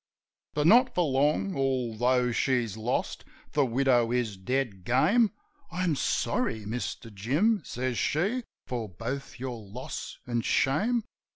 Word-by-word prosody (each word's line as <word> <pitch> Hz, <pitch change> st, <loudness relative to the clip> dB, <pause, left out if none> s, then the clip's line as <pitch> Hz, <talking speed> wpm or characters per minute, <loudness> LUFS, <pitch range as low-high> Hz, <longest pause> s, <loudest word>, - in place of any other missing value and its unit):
But 150 Hz, 0 st, +1 dB
not 245 Hz, +8 st, +6 dB
for 180 Hz, -, +3 dB
long. 150 Hz, +7 st, +1 dB
Although 125 Hz, -2 st, +1 dB
she's 120 Hz, -3 st, +1 dB
lost, 110 Hz, +3 st, -2 dB, 0.3 s
the 145 Hz, -, +3 dB
widow 125 Hz, -2 st, +2 dB
is 120 Hz, -4 st, 0 dB
dead 100 Hz, -1 st, -2 dB
game: 195 Hz, -, +4 dB, 0.4 s
"I'm 175 Hz, -2 st, 0 dB
sorry, 120 Hz, -, 0 dB
Mister 115 Hz, +1 st, -4 dB
Jim," 145 Hz, -, +1 dB
says 125 Hz, -2 st, -2 dB
she, 185 Hz, -, +1 dB, 0.2 s
"for 120 Hz, -4 st, -4 dB
both 120 Hz, +10 st, -6 dB
your 125 Hz, -3 st, -5 dB
loss 110 Hz, +6 st, -7 dB
an' 120 Hz, -1 st, -1 dB
shame. 210 Hz, -, +2 dB
130 Hz, 125 wpm, -28 LUFS, 115-150 Hz, 0.4 s, not